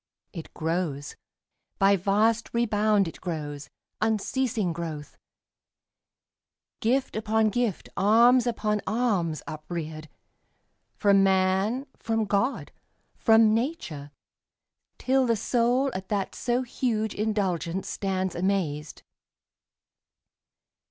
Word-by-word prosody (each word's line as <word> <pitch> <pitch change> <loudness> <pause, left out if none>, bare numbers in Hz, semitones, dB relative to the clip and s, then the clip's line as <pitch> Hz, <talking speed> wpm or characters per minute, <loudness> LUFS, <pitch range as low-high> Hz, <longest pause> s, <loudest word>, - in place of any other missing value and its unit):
It 165 -4 -8
grows— 160 -3 -2 0.6
By 195 +1 +5
vast 210 +5 +1
rebound 215 -4 +2
it 165 - -9
grows, 150 -5 -5 0.3
unceasing 220 -2 0
growth; 160 -3 -6 1.6
Gift 260 +3 0
upon 220 0 +1
gift, 240 -5 -1
alms 235 +5 +5
upon 210 -3 0
alms, 200 -9 0
upreared, 155 0 -6 0.9
From 200 -1 +4
man, 190 +6 +2
from 225 -1 -1
God, 205 +6 -1 0.4
from 225 -1 +5
nature, 225 - -3 0.9
till 260 0 +2
the 230 - +3
soul 245 +5 +1
At 185 0 -6
that 200 -2 -1
so 245 +1 -1
huge 225 -3 -1
indulgence 190 -4 -1
stands 190 -2 -2
amazed. 170 -5 -2
205 Hz, 90 wpm, -26 LUFS, 175-230 Hz, 1.6 s, By